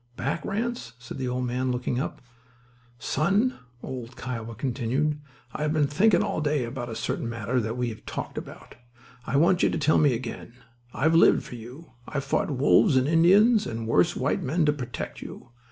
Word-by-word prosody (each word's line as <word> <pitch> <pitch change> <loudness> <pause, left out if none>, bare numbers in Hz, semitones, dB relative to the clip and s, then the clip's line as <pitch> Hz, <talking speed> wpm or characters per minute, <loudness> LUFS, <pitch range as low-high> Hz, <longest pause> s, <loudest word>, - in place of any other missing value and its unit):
"Back, 150 +3 -2
Ranse?" 215 - -3
said 125 +2 -9
the 130 - -2
old 125 0 -1
man, 125 +1 -1
looking 125 0 -1
up. - - -4 0.7
"Son," 195 - +1 0.2
old 125 -1 -7
"Kiowa" 115 -2 -5
continued, 135 +5 -1 0.3
"I've 150 0 -1
been 155 -2 +3
thinking 175 +8 +3
all - - -2
day 145 -3 +1
about 120 0 -5
a 115 - -5
certain 115 - -3
matter 115 +2 -1
that 115 +1 -3
we 125 -1 0
have 110 - -9
talked - - -5
about. - - -9 0.5
I 140 - +1
want 175 +4 +4
you - - +4
to - - -1
tell 155 0 +3
me 145 -4 +4
again. 115 -1 -7 0.4
I've 155 +7 +1
lived 165 - +5
for - - -10
you. 125 +6 -10 0.2
I've 140 -2 -3
fought 190 +7 0
wolves 140 0 +4
and 130 +1 +2
Indians 200 +7 +5
and 115 0 -4
worse 90 -6 +3
white - - 0
men 155 +5 +1
to 150 - +3
protect 125 -5 -6
you. - - -10
135 Hz, 185 wpm, -26 LUFS, 120-155 Hz, 0.7 s, lived